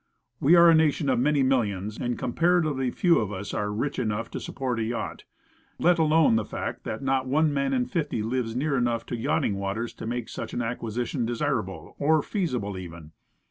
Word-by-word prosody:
We 155 +6 +5
are 170 0 +8
a 165 - +7
nation 155 -2 +2
of 125 -2 +2
50,000,000, 125 -8 +1
and 120 -1 -1
comparatively 150 0 +1
few 170 +7 +3
of 105 -2 -2
us 100 +1 -5
are 105 0 -1
rich 135 +7 -2
enough 115 -1 -2
to - - -4
sup - - -8
port 130 -3 -1
a - - 0
yacht, 115 +1 -4 0.5
let 175 0 +3
alone 155 -6 +4
the - - 0
fact - - -5
that - - -4
not 135 -1 +1
one 150 +3 +2
man 140 -1 0
in 125 -2 +1
fifty 145 -5 -2
lives 115 0 -2
near 140 +3 0
enough 120 -2 0
to - - -4
yachting 105 -3 0
waters 100 +4 -3
to - - -7
make 120 0 -3
such - - -6
an 120 - -1
acquisition 120 +2 -3
desirable 120 -1 -3
or 155 +1 +3
feasible, 125 - -2
even. 85 -3 -10
125 Hz, 195 wpm, -26 LUFS, 115-145 Hz, 0.5 s, are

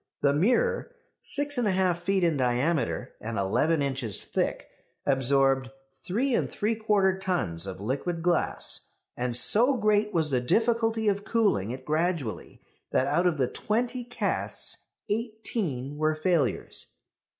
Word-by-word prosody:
The 140 -1 +3
mirror, 475 - +1 0.3
6 285 -1 -1
1/2 190 -5 +2
feet 185 +2 0
in 165 -3 +3
diameter 130 +1 0
and 115 0 -4
eleven 145 +11 +1
inches 135 -6 -2
thick, - - -2 0.4
absorbed 135 -1 +2 0.3
3 240 +9 0
3/4 210 -4 +1
tons 100 - 0
of 95 -1 -6
liquid 140 - -2
glass; 175 -1 +1 0.3
and 120 -1 +1
so 245 - +5
great 210 -1 +2
was 160 -5 +1
the 125 -2 +2
difficulty 225 - +1
of 200 0 +1
cooling 205 - +1
it 130 +2 -6
gradually, 155 -6 -2 0.3
that - - +2
out 175 +4 +2
of 170 -3 +1
the 130 -3 +2
twenty 240 - -2
casts 245 +1 -3 0.2
eighteen 205 - -3
were 155 0 +2
failures. 155 - -1
175 Hz, 130 wpm, -27 LUFS, 135-215 Hz, 0.4 s, so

